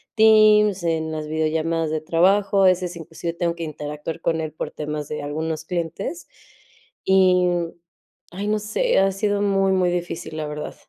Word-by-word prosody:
teams, 215 -3 +5
en 160 -1 -1
las 155 -1 -4
videollamadas 160 +1 -1
de 155 -1 -2
trabajo, 195 +5 +3
a - - +6
veces, 180 -1 +1
inclusive 165 +1 -6
tengo 170 0 -1
que 170 - -6
interactuar 150 +1 -6
con 165 -1 0
él 155 -1 -4
por - - -6
temas 150 -1 -5
de 150 -1 -5
algunos 155 +2 -3
clientes. 175 - -4 0.8
Y 185 -1 +4 0.8
ay, 200 +3 -5
no 215 0 +1
sé, 215 - +1
ha 195 0 +3
sido 205 +1 0
muy, 195 -1 +2
muy 180 -2 +2
difícil, 175 -2 -4
la 155 - -3
verdad. 150 0 -6
170 Hz, 165 wpm, -22 LUFS, 155-195 Hz, 0.8 s, a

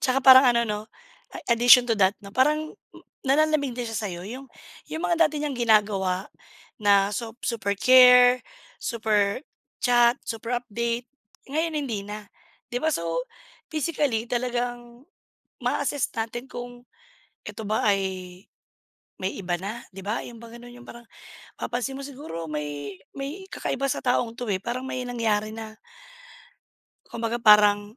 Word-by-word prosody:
'Tsaka 260 0 +2
parang 260 0 +9
ano 235 0 +2
'no 210 0 -2 0.5
a - - -5
addition 245 +1 +7
to 230 - +2
that 190 +1 +4
'no 200 - -10
parang 305 +6 +1 0.5
nanlalamig 285 -2 +2
din 245 -1 -4
siya 225 -1 -3
sa 215 - -3
'yo 175 0 -7
yung 260 +5 -8 0.4
yung 320 +2 -4
mga 340 -2 +3
dati 300 0 -5
niyang 290 -2 -2
ginagawa 205 -5 +2 0.5
na 200 -1 +4
sop 230 +2 -6
super 205 -4 -1
care, 250 -1 +7 0.4
super 215 -2 0 0.4
chat, 240 -1 +4
super 230 +1 -3
update, 235 +1 -3 0.4
ngayon 320 +2 -1
hindi 240 -8 -3
na. 210 0 -7 0.5
'Di 245 - -1
ba 315 - +2
so, 165 - -2 0.5
physically 290 -7 -1
talagang 240 0 -3 0.6
ma-a-assess 285 -3 0
natin 230 +2 -4
kung, 245 -1 -9 0.6
eto 220 - -7
ba 215 - 0
ay 190 -3 -1 0.8
may 190 +1 -2
iba 180 -3 -2
na 210 +5 -5
'di 195 +1 -10
ba, 215 +3 -2
yun 235 - -10
ba 235 - -11
ganun 240 +1 -11
yung 245 0 -14
parang 235 0 -11 0.5
papansin 245 +2 -3
mo 275 - -7
siguro 265 - -7
may 150 +2 -5 0.2
may 285 +8 -6
kakaiba 275 - -3
sa - - -2
taong 245 -2 0
'to, 245 -3 -5
eh, 195 - +1
parang 245 +3 -4
may 255 -1 -4
nangyari 220 -3 -1
na 220 -1 -8 1.3
Kumbaga 230 +1 -3
parang 210 0 +5
235 Hz, 150 wpm, -25 LUFS, 210-255 Hz, 1.3 s, parang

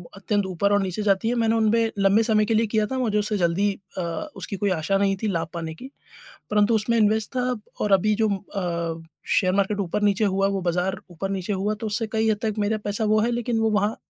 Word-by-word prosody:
अत्यंत 200 0 -1
ऊपर 190 +2 0
और 205 - +3
नीचे 190 +1 -3
जाती 200 +2 +2
है। 245 - 0
मैंने 225 0 +2
उनमें 225 0 +2
लंबे 200 +3 +4
समय 215 -2 +2
के 225 - 0
लिए 225 +1 +2
किया 215 0 +1
था 265 - -1
मुझे 220 -4 0
उससे 210 0 0
जल्दी 185 +3 +1 0.3
अ, - - -1 0.4
उसकी 205 - -4
कोई 200 +2 0
आशा 175 +5 +1
नहीं 195 0 +2
थी - - +1
लाभ 170 -5 -1
पाने 165 -2 -4
की। 260 - -8 0.6
परंतु 210 +2 +3
उसमें 220 +2 +1
इन्वेस्ट 215 0 +2
था 250 0 0 0.3
और 210 - 0
अभी 210 +3 +3
जो - - +4
म 200 - 0
अ, 170 -4 -4 0.4
शेयर 185 -3 +1
मार्केट 200 +1 +1
ऊपर-नीचे 200 +2 +1
हुआ 195 0 +1
है - - -1
वो 195 - -1
बाज़ार 180 +2 -1
ऊपर-नीचे 195 +3 -3
हुआ 200 +2 -1
तो 225 - -2
उससे 215 +2 -1
कई 220 0 +2
हद 210 - 0
तक 215 -2 -1
मेरा 210 +1 +1
पैसा 205 +2 -1
वो 215 +1 +3
है 230 - +1
लेकिन 240 -1 -1
वो 225 0 +2
वहाँ 210 +1 +1
205 Hz, 240 wpm, -24 LUFS, 195-220 Hz, 0.6 s, लंबे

